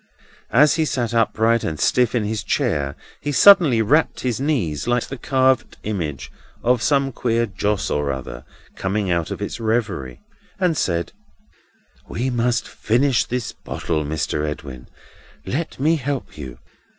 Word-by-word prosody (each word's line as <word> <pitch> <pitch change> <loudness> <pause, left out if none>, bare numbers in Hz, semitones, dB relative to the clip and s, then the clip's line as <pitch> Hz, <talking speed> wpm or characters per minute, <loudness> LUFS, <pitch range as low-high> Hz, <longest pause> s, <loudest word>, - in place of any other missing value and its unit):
As 150 +6 +5
he 160 - +2
sat 120 -5 -1
upright 115 0 +2
and 80 -2 -3
stiff 125 -2 +2
in 115 - +1
his 110 +1 -2
chair, 70 -2 0 0.2
he 145 - -3
suddenly 145 - +6
rapped 150 +9 +2
his 125 -2 -1
knees, 120 - -1
like 120 0 +2
the 135 - -6
carved 130 0 +1
image 75 -11 -4 0.3
of 125 -1 +2
some 140 -1 +2
queer 115 -1 0
Joss 105 -1 -1
or 75 -1 0
other 60 -2 -6 0.3
coming 95 0 -1
out 85 -2 0
of - - -4
its - - -5
reverie, 105 - -2 0.4
and 180 -4 +2
said: 85 - -1 1.0
"We 130 +3 -2
must 120 0 0
finish 125 +1 +1
this 125 -2 -3
bottle, 80 -3 -3
Mr. 75 0 -2
Edwin. 70 -4 -6 0.6
Let 150 - -3
me 160 +4 +3
help 140 -1 -4
you. 65 -5 -8
115 Hz, 150 wpm, -21 LUFS, 80-130 Hz, 1.0 s, suddenly